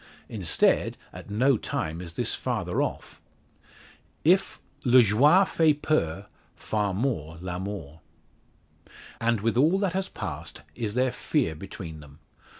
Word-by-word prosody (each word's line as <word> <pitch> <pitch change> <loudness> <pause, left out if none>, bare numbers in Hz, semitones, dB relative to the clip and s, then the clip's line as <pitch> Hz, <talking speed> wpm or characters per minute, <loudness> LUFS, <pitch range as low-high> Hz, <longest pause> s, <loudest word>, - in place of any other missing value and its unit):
Instead, 95 -7 +1 0.2
at - - -10
no 125 +5 +3
time 80 -4 -3
is 85 -2 -8
this - - -1
farther - - -2
off. - - -4 1.0
If 185 +5 +3 0.2
le 125 -1 +7
joie 145 - +5
fait 155 -4 +2
peur, 95 - 0 0.3
far 105 -2 -1
more 90 - -2
l'amour. 90 -3 -6 1.2
And 115 -2 +1
with 115 +2 0
all 160 +8 +4
that 195 -3 0
has 190 0 -2
passed 75 - -6
is 110 -3 -4
there 130 0 +2
fear 80 - 0
between 80 -1 -8
them. 70 -1 -14
105 Hz, 130 wpm, -26 LUFS, 85-135 Hz, 1.2 s, le